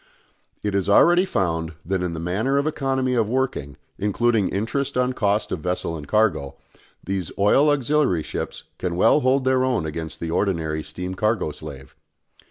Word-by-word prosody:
It 105 -1 -1
is 100 0 0
already 175 - +6
found 80 - -1
that 95 0 -1
in 90 -2 -2
the - - -4
matter 105 +11 0
of 140 - +1
economy 135 -4 0
of 115 -4 +1
working, 120 - -2 0.2
including 105 +1 +1
interest 130 +7 -2
on 125 0 +1
cost 105 -2 0
of 90 - -2
vessel 90 0 -2
and 75 -3 -8
cargo, 105 -10 +1 0.5
these 95 -3 -3
oil 120 +9 +4
auxiliary 140 - +2
ships - - -5 0.2
can 90 -2 -2
well 115 +10 +5
hold 130 -1 +2
their 130 -1 +3
own 125 -10 0
against 80 +1 -5
the 85 -1 -4
ordinary 80 -5 0
steam 90 +5 -6
cargo 105 -4 0
slave. 70 -3 -10
100 Hz, 170 wpm, -23 LUFS, 85-130 Hz, 0.5 s, already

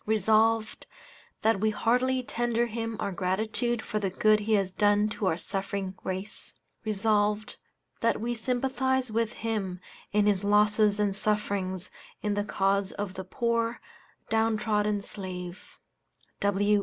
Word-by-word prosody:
Resolved, 220 +1 +2 0.6
That 220 -2 +3
we 220 +2 +2
heartily 250 +4 +1
tender 240 -1 0
him 225 -1 -4
our 200 - -1
gratitude 220 +6 -1
for 215 - -2
the 195 -2 -1
good 215 +3 +3
he 215 +1 0
has 195 -2 0
done 205 +1 +3
to 210 -2 -2
our 160 - +1
suffering 195 0 -3
race. 190 +3 -5 0.3
Resolved, 210 0 +1 0.4
That 230 - +1
we 235 +2 -1
sympathize 260 +1 0
with 230 +1 0
him 205 -5 -3 0.3
in 210 0 +3
his 205 -2 +2
losses 210 0 +3
and 205 -2 +1
sufferings 200 -3 -1 0.3
in 210 -1 +1
the 205 0 0
cause 195 -1 +1
of 200 -2 -4
the 190 - -6
poor, 230 +4 -1 0.5
down 225 0 +2
trodden 210 -2 0
slave. 185 -3 -7
210 Hz, 135 wpm, -28 LUFS, 200-225 Hz, 0.6 s, That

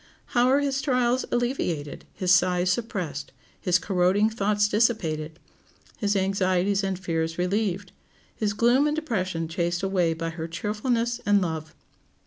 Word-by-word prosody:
How 245 0 +4
are 275 +2 +4
his 275 -1 0
trials 250 -2 +1
alleviated, 180 - -2
his 185 -1 0
sighs 180 0 +3
suppressed, 180 - -3 0.3
his 180 0 +2
corroding 190 +3 +2
thoughts 210 -1 +1
dissipated, 165 -9 0 0.6
his 205 -2 +1
anxieties 195 0 +1
and 195 -1 -1
fears 165 -3 -2
relieved, 190 0 -1 0.4
his 210 -2 -1
gloom 240 +7 +3
and 300 - 0
depression 185 - -2
chased 175 +1 -2
away 180 -4 +1
by 165 0 -3
her 165 0 -5
cheerfulness 230 +7 -1
and 205 0 +4
love! 160 -4 -4
195 Hz, 135 wpm, -25 LUFS, 175-225 Hz, 0.6 s, How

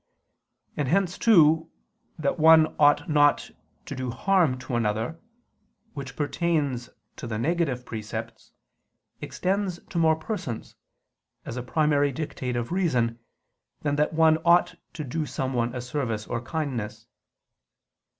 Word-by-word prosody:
And 145 - -1
hence 185 +3 +1
too, 160 -7 +5 0.5
that 155 +2 -1
one 160 0 +6
ought 145 +2 +4
not 145 -2 +3 0.3
to - - -6
do 130 0 -3
harm 165 +1 +2
to 130 -1 -4
another, 115 +7 -1 0.7
which 140 -2 -7
pertains 145 -5 -1 0.3
to - - -6
the 110 -2 -3
negative 140 -2 -1
precepts, 110 -2 -7 0.7
extends 190 -1 -2
to 170 - -1
more 160 -1 +4
persons, 160 - -5 0.7
as - - -6
a 125 - -3
primary 145 +2 +1
dictate 130 -3 -4
of 120 +3 -3
reason, 125 -11 0 0.6
than 145 -1 0
that 150 +1 +2
one 160 0 +5
ought 175 +2 +4 0.2
to 155 - -5
do 150 +3 -3
someone 125 -3 -2
a 125 - -3
service 120 -4 -3
or 120 - -3
kindness. 120 -7 -4
145 Hz, 130 wpm, -26 LUFS, 125-160 Hz, 0.7 s, one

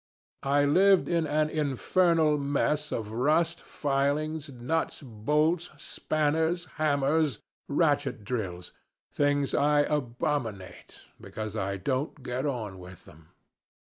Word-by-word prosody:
I 145 +1 +4
lived 190 +6 +5
in 170 -2 +1
an 155 +1 +1
infernal 155 +2 +2
mess 145 +1 0
of 110 -2 -3
rust, 155 +8 +1
filings, 145 +2 -1
nuts, 140 +5 -2
bolts, 150 +9 0
spanners, 160 +4 0 0.2
hammers, 145 -2 +2 0.3
ratchet - - +1
drills 95 -6 -4 0.4
things 145 -1 +1
I 145 +1 +4
abominate, 125 -7 -3 0.2
because 110 -1 -6
I 100 -2 -2
don't 130 - -2
get 130 +2 -2
on 110 -8 -4
with 90 0 -12
them. 75 0 -17
145 Hz, 110 wpm, -28 LUFS, 120-155 Hz, 0.4 s, lived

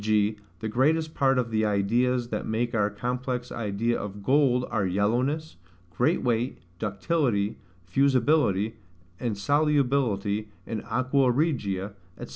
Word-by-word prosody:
g. 105 0 +2 0.3
the 110 - -2
greatest 155 +8 +1
part 135 -1 +2
of 120 -2 0
the 110 0 +1
ideas 120 +4 +1
that - - -2
make 115 +2 -1
our 105 -2 +2
complex 125 +3 -3
idea 115 +1 -1
of 100 0 -7
GOLD 130 -1 +3
are 105 - +1
yellowness, 125 - 0 0.4
great 150 +8 +2
weight, 120 +1 0 0.2
ductility, 105 - 0 0.3
fusibility, 120 - +2 0.4
and 115 -5 -2
solubility 125 -6 +1 0.2
in 110 -2 -4
AQUA 130 +3 +1
REGIA, 105 - -1 0.3
&c. - - -16
120 Hz, 125 wpm, -26 LUFS, 105-135 Hz, 0.4 s, GOLD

